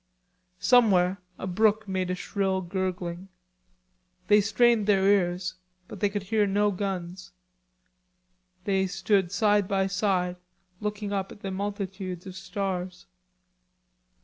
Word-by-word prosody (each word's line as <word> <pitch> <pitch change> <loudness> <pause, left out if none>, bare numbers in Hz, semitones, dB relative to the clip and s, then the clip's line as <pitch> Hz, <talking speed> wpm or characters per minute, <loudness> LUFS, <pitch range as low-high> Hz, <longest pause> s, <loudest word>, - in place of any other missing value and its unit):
Somewhere 195 -6 +4 0.2
a - - -5
brook 215 +3 +2
made 185 -1 -1
a 180 - 0
shrill 190 0 -1
gurgling. 180 0 -3 1.0
They 210 0 +7
strained 220 +1 +3
their 195 -2 +3
ears, 185 -2 +2 0.3
but 205 - -9
they 205 - +2
could 205 -1 -3
hear 210 +1 +1
no 205 +1 +2
guns. 185 -2 -5 1.3
They 190 -1 +1
stood 190 -1 +1
side 205 -2 +2
by 195 -1 +1
side 190 -2 0 0.4
looking 210 -1 -3
up 195 -1 -2
at - - -12
the 195 - -4
multitudes 190 -2 -4
of 190 - -7
stars. 185 -2 -4
195 Hz, 120 wpm, -27 LUFS, 185-205 Hz, 1.3 s, They